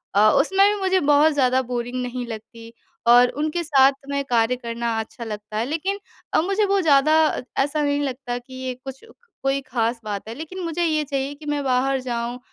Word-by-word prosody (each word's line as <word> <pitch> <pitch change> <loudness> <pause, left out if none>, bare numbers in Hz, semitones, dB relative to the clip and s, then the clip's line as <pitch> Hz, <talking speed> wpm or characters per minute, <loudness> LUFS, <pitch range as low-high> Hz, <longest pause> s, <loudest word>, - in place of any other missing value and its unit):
अ, 210 +2 +6
उसमें 390 +1 +4
भी 415 - -4
मुझे 375 0 +2
बहुत 295 0 +4
ज़्यादा 260 -2 +2
बोरिंग 245 0 -4
नहीं 250 0 -4
लगती 230 0 -9 0.3
और 245 +1 +7
उनके 310 +3 -1
साथ 275 -4 +5 0.2
में 280 0 -1
कार्य 235 -1 +2
करना 235 -1 -3
अच्छा 225 +2 -7
लगता 210 -1 -6
है। 225 - 0
लेकिन 330 +8 -2 0.3
अ, - - +4
मुझे 395 +5 +1
वो 395 0 +2
ज़्यादा 305 -1 +4 0.5
ऐसा 295 +2 -1
नहीं 285 0 +1
लगता 255 -3 -3
कि 245 +2 -12
ये 260 0 -4
कुछ 270 -1 -9 0.4
कोई 270 0 +2
खास 235 -2 -1
बात 205 -1 -5
है 225 - -5
लेकिन 320 +6 -8
मुझे 335 +1 -2
ये 310 -2 +1
चाहिए 275 0 -2
कि 300 +1 -14
मैं 295 -1 -1
बाहर 265 +1 +1
जाऊँ। 240 -1 -3
265 Hz, 195 wpm, -22 LUFS, 240-300 Hz, 0.5 s, और